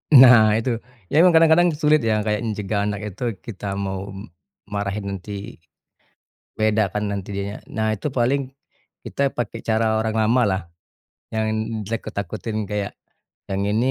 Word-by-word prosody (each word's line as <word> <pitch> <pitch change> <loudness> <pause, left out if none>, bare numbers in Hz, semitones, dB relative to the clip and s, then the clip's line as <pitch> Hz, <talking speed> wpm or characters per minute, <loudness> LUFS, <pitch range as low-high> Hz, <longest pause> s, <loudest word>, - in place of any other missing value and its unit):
Nah, 120 -5 +8
itu. 115 0 -1 0.3
Iya, 155 - +4
emang 180 -1 +6
kadang-kadang 165 +2 +6
sulit, 150 0 +4
ya, 110 -2 +1
kayak 105 -1 0 0.2
cegah 100 0 -1
anak 105 -1 -4
itu. 115 0 -3
Kita 100 -3 -5
mau 95 0 -4
m 100 +1 -8 0.4
marahin, 100 0 -3
nanti, 100 +1 -6 1.0
beda, 110 -1 +2
kan, 105 +3 -3
nanti 100 -1 -5
dianya 100 +1 -3
nah, 110 -1 -1
itu 110 +7 -3
paling 130 +2 +1 0.6
kita 140 0 0
pakai 120 - -3
cara 110 0 +1
orang 110 0 -1
lamalah, 110 -6 +1 0.6
yang 110 0 0 0.3
ditakut-takutin, 110 0 -4
kayak, 105 -1 -2 0.6
"Yang 95 0 -1
ini, 120 +4 +2
110 Hz, 140 wpm, -22 LUFS, 100-115 Hz, 1.0 s, Nah